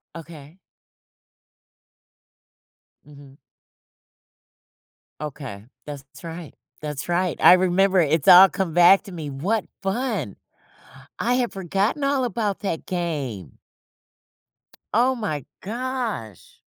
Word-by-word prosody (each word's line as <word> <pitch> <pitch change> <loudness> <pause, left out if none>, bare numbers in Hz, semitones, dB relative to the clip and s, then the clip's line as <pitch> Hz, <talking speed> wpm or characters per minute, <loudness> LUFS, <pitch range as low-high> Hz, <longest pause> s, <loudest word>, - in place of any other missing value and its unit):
Okay. 165 +1 -12 2.5
Mhm. 140 -2 -16 1.9
Okay. 130 -8 -7 0.2
That's 140 +1 -11
right, 165 -2 -8 0.3
that's 150 +1 -6
right. 175 0 0
I - - +9
remember 185 +1 +3
it 155 -2 +2
it's 155 -3 0
all 185 +2 +10
come 185 -4 -3
back 175 +4 +6
to 200 - -11
me, 160 -4 -6
what 190 +11 -2 0.2
fun. 195 - -2 0.8
I 245 +3 +1
have 245 -2 0
forgotten 195 - -1
all 275 -2 +1
about 215 -4 -2
that 180 -6 -3
game. 140 - -4 1.4
Oh 250 +4 +3
my 155 - -4 0.2
gosh. 230 - -5
175 Hz, 100 wpm, -23 LUFS, 150-205 Hz, 2.5 s, all